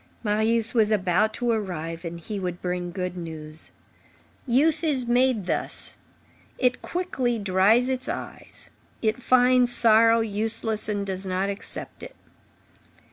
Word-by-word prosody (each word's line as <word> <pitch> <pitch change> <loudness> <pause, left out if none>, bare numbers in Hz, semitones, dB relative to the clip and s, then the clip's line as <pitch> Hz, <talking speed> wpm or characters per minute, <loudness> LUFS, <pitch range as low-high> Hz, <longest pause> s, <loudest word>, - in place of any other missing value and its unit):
Marius 220 +1 +1
was 220 -3 +3
about 205 0 +2
to 240 -1 0
arrive, 170 -6 -3
and 170 0 -6
he 200 +5 -5
would 180 -2 -4
bring 180 0 -3
good 180 -1 -4
news. 160 -2 -8 0.8
Youth 300 +6 +2
is 280 -6 0
made 245 -3 +2
thus; - - -3 0.6
it 250 -1 +1
quickly 270 -10 -2
dries 205 +4 +3
its 260 -1 -3
eyes; - - -8 0.3
it 220 +3 0
finds 250 0 +4
sorrow 230 0 +5
useless 220 0 -1
and 205 -1 -1
does 190 0 -4
not 190 +2 -1
accept 200 - -8
it. - - -9
215 Hz, 135 wpm, -25 LUFS, 185-245 Hz, 0.8 s, sorrow